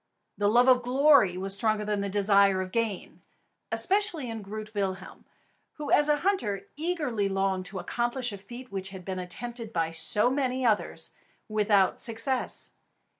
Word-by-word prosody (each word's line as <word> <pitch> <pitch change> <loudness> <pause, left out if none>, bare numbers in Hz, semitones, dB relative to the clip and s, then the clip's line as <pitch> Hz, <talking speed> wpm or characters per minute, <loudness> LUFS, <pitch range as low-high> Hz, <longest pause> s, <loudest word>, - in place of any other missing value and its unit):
The 205 - +1
love 240 +4 +4
of 255 -1 +6
glory 250 -6 +4
was 195 +1 -1
stronger 215 +1 +1
than 210 -1 -1
the 200 - -2
desire 200 -1 +3
of 185 0 -4
gain, 225 -4 -3 0.5
especially 375 - 0
in 225 -1 -5
Groot 215 +2 -7
Willem, 195 -2 -4 0.5
who 300 -1 -6
as 295 0 +4
a 295 - +4
hunter 210 - 0
eagerly 295 - -1
longed 195 -1 -1
to 195 - -7
accomplish 240 +4 -2
a 200 - -8
feat 240 +6 -11
which 190 -1 -4
had 190 -2 -10
been 190 -1 -4
attempted 230 +5 -7
by 165 -5 -1
so 205 +8 +2
many 260 -2 -1
others 215 -3 0 0.4
without 210 -3 +2
success. 235 +3 -2
215 Hz, 160 wpm, -28 LUFS, 195-250 Hz, 0.5 s, of